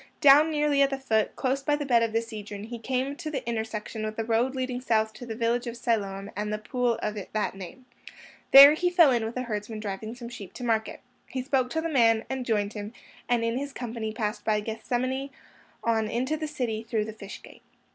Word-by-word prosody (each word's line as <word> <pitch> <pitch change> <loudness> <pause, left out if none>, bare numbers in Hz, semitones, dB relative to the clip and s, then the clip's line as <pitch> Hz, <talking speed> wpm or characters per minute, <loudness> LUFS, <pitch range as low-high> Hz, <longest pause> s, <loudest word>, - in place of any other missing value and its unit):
Down 290 +3 +7
nearly 295 -2 +2
at 275 - +5
the 270 - -2
foot, 220 -5 0
close 265 +1 0
by 295 +2 +1
the 295 0 -3
bed 240 -4 +4
of 230 -1 +1
the 225 +1 0
Cedron, 210 -3 -8
he 235 +1 -7
came 260 +4 -2
to 315 -2 -5
the 270 -6 -4
intersection 220 -1 -3
with 215 0 -3
the 225 - -2
road 235 +4 +1
leading 255 -1 -2
south 220 -3 +1
to 245 - -10
the 225 - -4
village 235 +1 0
of 235 0 -5
Siloam 205 -5 -2
and 210 +1 -3
the 210 - -1
pool 240 +3 0
of 210 - -1 0.2
that 215 -1 0
name. 195 +7 -10 0.6
There 280 +2 +11
he 355 +3 +1
fell 345 -5 +6
in 240 -2 +1
with 225 +3 -4
a 255 - -1
herdsman 215 -1 -4
driving 215 +2 -5
some 240 -1 -8
sheep 205 -6 -9
to 250 - -8
market. 225 -2 -1 0.3
He 260 -1 -4
spoke 260 -2 +1
to 320 - -1
the 330 - -2
man, 230 -7 +3
and 265 -2 -3
joined 210 -2 0
him, 210 +1 -6 0.4
and 240 -1 +2
in 230 +2 0
his 285 0 -5
company 230 -3 -4
passed 215 -1 -3
by 215 -1 +1
Gethsemane 245 +5 -2 0.5
on 225 -2 +1
into 255 +7 -1
the 310 0 -4
city 245 -7 -3
through 225 -1 -1
the 220 - -7
Fish 205 -2 -9
Gate. - - -15
235 Hz, 225 wpm, -27 LUFS, 220-260 Hz, 0.6 s, There